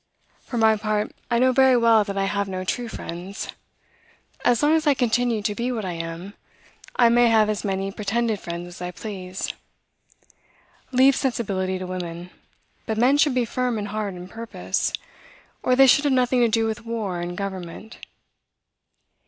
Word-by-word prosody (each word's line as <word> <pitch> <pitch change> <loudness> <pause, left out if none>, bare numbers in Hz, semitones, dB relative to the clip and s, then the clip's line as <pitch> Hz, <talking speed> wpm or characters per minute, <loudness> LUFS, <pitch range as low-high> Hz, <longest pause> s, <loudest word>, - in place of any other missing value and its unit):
For 240 - -6
my 220 -1 +4
part, 210 0 -1 0.2
I 235 - +2
know 255 +2 +4
very 265 -1 +5
well 230 -2 +5
that 200 -1 -4
I 195 - +1
have 200 0 -1
no 185 -1 -3
true 240 +6 -2
friends. 185 -1 -6 0.9
As 245 +2 +3
long 300 +2 +4
as 320 -1 +2
I 290 - +5
continue 240 -3 +1
to 210 0 0
be 240 +4 -2
what 220 -5 -3
I 185 - -2
am, 165 +3 -6 0.6
I 240 - +5
may 240 +1 +5
have 220 -2 +4
as 210 - -4
many 195 -1 -2
pretended 215 +2 -1
friends 170 0 -6
as 175 - -12
I 180 - -3
please. 185 -1 -5 1.4
Leave 260 +1 +5
sensibility 195 -9 -1
to 185 - -5
women; 180 -1 -6 0.6
but 220 -2 -1
men 260 +5 +4
should 290 -3 +3
be 250 -2 +2
firm 250 0 -1
in 205 - -3
heart 210 -3 -3
and 180 0 -8
purpose, 225 +4 -3 0.7
or 255 - +2
they 270 +1 +7
should 285 +3 +5
have 285 - +3
nothing 255 0 +2
to 240 - +5
do 225 0 +1
with 220 0 -3
war 220 -6 -3
and 175 0 -5
government." 195 +2 -6
220 Hz, 175 wpm, -24 LUFS, 190-245 Hz, 1.4 s, they